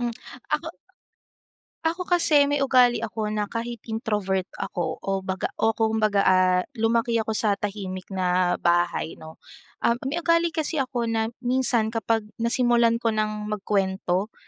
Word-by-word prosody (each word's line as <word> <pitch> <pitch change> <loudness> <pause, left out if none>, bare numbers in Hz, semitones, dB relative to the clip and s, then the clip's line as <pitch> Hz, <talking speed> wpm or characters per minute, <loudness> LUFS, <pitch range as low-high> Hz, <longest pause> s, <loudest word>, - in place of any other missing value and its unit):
Mm, 240 -1 -1 0.4
ako - - -1 1.2
ako 340 +3 0 0.2
kasi, 295 -4 +4
may 290 - +1
ugali 250 -2 +5
ako 220 -1 -3
na 210 -1 -1
kahit 235 +2 -5
introvert 210 -4 -2
ako 175 -2 -3
o 195 -1 -1
baga 190 0 -3
o 220 - +4
kumbaga, 220 -2 +2
ah 185 -1 +4
lumaki 230 +1 +1
ako 220 0 -2
sa 210 -2 +2
tahimik 195 -2 -5
na 180 -1 +1
bahay, 175 -1 +1
'no. 160 0 -12 0.5
Um, 235 - +4 0.2
may 320 - -2
ugali 335 0 +2
kasi 315 -2 -1
ako 250 -2 -2
na 225 -1 0 0.2
minsan 245 -3 +1
kapag 225 -1 0 0.2
nasimulan 235 -1 +3
ko 230 -2 0
nang 215 0 -2
magkuwento 195 -1 -1
220 Hz, 145 wpm, -25 LUFS, 195-240 Hz, 1.2 s, ugali